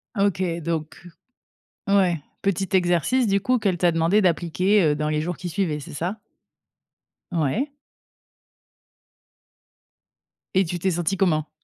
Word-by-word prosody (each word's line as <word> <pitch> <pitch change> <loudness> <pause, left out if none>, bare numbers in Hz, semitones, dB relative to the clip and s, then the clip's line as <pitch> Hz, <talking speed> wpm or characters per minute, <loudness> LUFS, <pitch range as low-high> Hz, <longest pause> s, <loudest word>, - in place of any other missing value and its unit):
Ah, 200 -1 +3
OK, 190 -2 0 0.2
donc 160 -1 -3 0.9
ouais, 185 -5 +3 0.2
petit 195 -1 0
exercice, 180 +8 +2
du 200 -1 +2
coup, 250 +5 +1
qu'elle 195 -5 0
t'a 175 0 +3
demandé 165 +6 +3
d'appliquer, 185 +2 +2
heu, 150 -1 +3
dans 150 +1 -2
les 155 0 0
jours 175 +2 -3
qui 180 - -6
suivaient, 170 -4 -1
c'est - - -10
ça? 180 +8 -3 1.1
Ouais. 175 - 0 2.9
Et 190 0 +4
tu 175 +2 -4
t'es 190 +2 +1
sentie 175 +3 -1
comment? 160 -5 +1
180 Hz, 135 wpm, -23 LUFS, 165-195 Hz, 2.9 s, Et